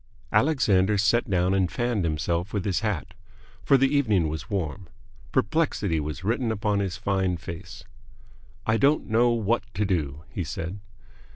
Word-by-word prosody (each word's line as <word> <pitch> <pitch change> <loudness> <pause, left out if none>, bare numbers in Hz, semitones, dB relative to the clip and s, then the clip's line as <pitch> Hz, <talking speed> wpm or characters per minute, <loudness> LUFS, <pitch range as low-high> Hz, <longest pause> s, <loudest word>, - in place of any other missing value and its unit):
Alexander 105 -9 +3
sat 105 +4 +2
down 90 0 +2
and 95 -3 +1
fanned 120 -5 0
himself 85 +3 -1
with 100 -3 -1
his 100 -3 +1
hat, 105 -8 -3 0.5
for 140 - +4
the 135 +2 +2
evening 105 - +2
was 80 -1 -6
warm. 95 -1 -3 0.4
Perplexity 105 - +1
was 75 +3 -5
written 115 +3 0
upon 105 -1 0
his 100 -1 -2
fine 95 -3 0
face. 85 +2 -9 0.8
"I 110 0 +2
don't 140 +5 +3
know 120 +2 +3
what 115 0 +1
to 105 +2 +1
do," 75 -6 -2
he - - -3
said. 90 +5 -5
100 Hz, 155 wpm, -26 LUFS, 90-115 Hz, 0.8 s, for